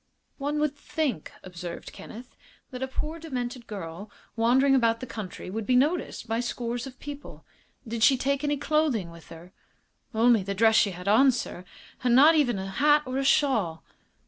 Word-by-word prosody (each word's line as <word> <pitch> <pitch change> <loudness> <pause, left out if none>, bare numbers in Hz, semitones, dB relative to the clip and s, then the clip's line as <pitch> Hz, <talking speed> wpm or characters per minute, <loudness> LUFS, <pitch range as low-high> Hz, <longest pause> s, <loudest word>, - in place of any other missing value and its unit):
"One 290 +2 -2
would 300 -1 0
think," 285 - -3
observed 175 -1 -8
Kenneth, 240 +3 -11 0.4
"that 250 0 -7
a 265 - -1
poor, 305 +5 -5
demented 250 -6 -5
girl, 195 0 -7 0.3
wandering 255 +4 +3
about 230 -3 +3
the 255 - -6
country, 205 -6 -7
would 220 +1 -4
be 255 - +3
noticed 290 -1 0
by 225 +1 -1
scores 240 +1 -3
of 255 -1 -12
people. 290 0 -9 0.4
Did 225 0 -4
she 265 +3 +6
take 280 +2 -1
any 290 0 0
clothing 285 - 0
with 170 -1 -15
her?" 170 +3 -13 0.6
"Only 230 0 +4
the 200 +1 -4
dress 220 +2 +4
she 210 - +4
had 180 0 -8
on, 260 +7 +6
sir, 210 -6 -5 0.4
and 245 -1 +3
not 295 +5 +7
even 270 -9 +2
a 190 - -4
hat 295 +6 +3
or 255 +1 -3
a - - 0
shawl." 225 - +1
245 Hz, 180 wpm, -26 LUFS, 210-280 Hz, 0.6 s, not